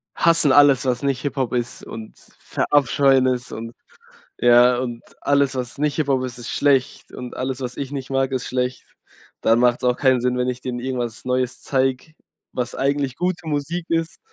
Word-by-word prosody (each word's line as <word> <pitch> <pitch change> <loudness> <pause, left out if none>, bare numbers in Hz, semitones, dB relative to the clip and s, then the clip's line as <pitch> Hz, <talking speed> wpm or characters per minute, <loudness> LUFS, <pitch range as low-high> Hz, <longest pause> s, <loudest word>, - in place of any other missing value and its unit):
hassen 165 -4 +3
alles, 140 -1 +6
was 125 -1 0
nicht 135 -2 -1
Hip-Hop 135 -4 -2
ist 120 -1 -3
und 110 -1 -9 0.2
verabscheuen 135 -1 +2
es 125 -1 -1
und, 115 +1 -7 0.7
ja, 120 0 +6
und 120 -2 -4 0.2
alles, 140 -1 +2
was 125 +2 -5
nicht 150 -1 0
Hip-Hop 135 -4 +1
ist, 125 -1 -6
ist 120 - -8
schlecht 135 -3 +1
und 125 -1 -8
alles, 130 0 -3
was 125 -1 -5
ich 140 -1 -5
nicht 135 -1 -5
mag, 135 0 +1
ist 130 -2 -2
schlecht. 125 0 -2 0.6
Dann 115 +1 +4
macht’s 125 0 +2
auch 125 0 +2
keinen 130 -3 +3
Sinn, 125 0 0
wenn 125 0 0
ich 125 0 -5
denen 125 -1 -4
irgendwas 120 -3 -4
Neues 125 -1 -1
zeig, 135 +2 -1 0.4
was 125 -1 -3
eigentlich 140 -1 0
gute 180 0 -2
Musik 155 +3 -2
ist. 165 0 -1
130 Hz, 180 wpm, -22 LUFS, 125-140 Hz, 0.7 s, alles